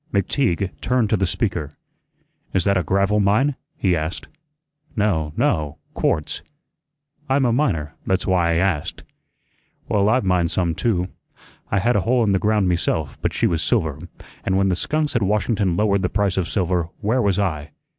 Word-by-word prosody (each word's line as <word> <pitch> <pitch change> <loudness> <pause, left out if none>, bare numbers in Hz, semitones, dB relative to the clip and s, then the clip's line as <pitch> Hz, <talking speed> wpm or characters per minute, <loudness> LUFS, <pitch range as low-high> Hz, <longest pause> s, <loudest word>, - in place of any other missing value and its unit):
McTeague 100 - 0
turned 125 -4 +1
to - - +5
the 95 -2 +1
speaker. 85 - -2 0.8
"Is 95 - +3
that 100 +1 +2
a 95 - +2
gravel 100 +5 +1
mine?" 105 +9 +3 0.2
he 90 -3 +2
asked. 80 +1 -3 0.7
"No, 90 -9 +1
no, 75 0 0 0.2
quartz." 75 - -1 0.9
"I'm 135 0 +3
a 120 - +2
miner; 80 - 0
that's 95 0 +1
why 90 -3 +2
I - - 0
asked." 85 -4 -1 0.8
"Well 100 0 +2
I've 130 +2 +2
mined 90 -2 +2
some 85 -1 0
too. 90 0 0 0.6
I 100 - +1
had 120 +5 +2
a 105 - +3
hole 120 +4 +2
in 105 - +2
the 95 - +2
ground 105 -2 +2
meself, 80 -4 -1
but - - 0
she - - 0
was 85 -2 +1
silver; 80 - 0 0.4
and 95 0 +1
when 95 0 +2
the 90 - +1
skunks 150 - -1
at 120 - +2
Washington 105 -2 +1
lowered 100 -2 +2
the 90 - 0
price 100 -2 0
of 95 -3 0
silver, 90 -3 0
where 115 +4 +1
was 100 -4 +1
I? 80 -7 -1
95 Hz, 175 wpm, -22 LUFS, 85-105 Hz, 0.9 s, to